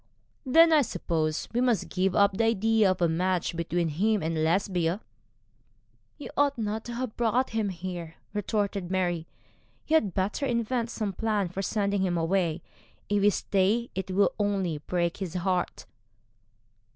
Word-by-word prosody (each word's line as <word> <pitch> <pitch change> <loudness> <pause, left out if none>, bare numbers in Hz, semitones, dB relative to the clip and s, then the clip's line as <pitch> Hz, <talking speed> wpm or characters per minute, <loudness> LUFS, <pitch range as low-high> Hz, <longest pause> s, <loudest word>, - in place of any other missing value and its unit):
'Then 330 +5 +6
I 305 - +6
suppose 160 - -2
we 240 - +1
must 245 -4 +1
give 185 0 0
up 200 -1 +4
the 225 +3 +2
idea 225 -1 +3
of 185 -1 0
a - - +5
match 175 +1 0
between 170 0 -1
him 205 +6 +1
and 160 0 -1
Lesbia.' 175 +1 +1 1.2
'You 290 - -8
ought 285 -1 +2
not 220 0 -2
to 240 - -6
have 250 -2 -4
brought 240 +2 +1
him 220 -2 0
here,' 175 -2 -6 0.2
retorted 205 -2 -1
Mary. 175 -3 -1 0.6
'You 320 - +4
had 205 - -1
better 205 +9 -1
invent 235 0 -1
some 215 -4 -3
plan 210 -2 0
for 185 +3 -4
sending 200 0 0
him 180 -2 0
away. 170 -1 0 0.5
If 205 0 +2
he 205 - +6
stay 205 +4 +1
it 190 0 -4
will 195 +2 +3
be - - +3
only 190 -6 -1
to 145 - -29
break 170 -1 0
his 185 -3 -5
heart.' 180 0 -1
195 Hz, 165 wpm, -27 LUFS, 175-220 Hz, 1.2 s, Then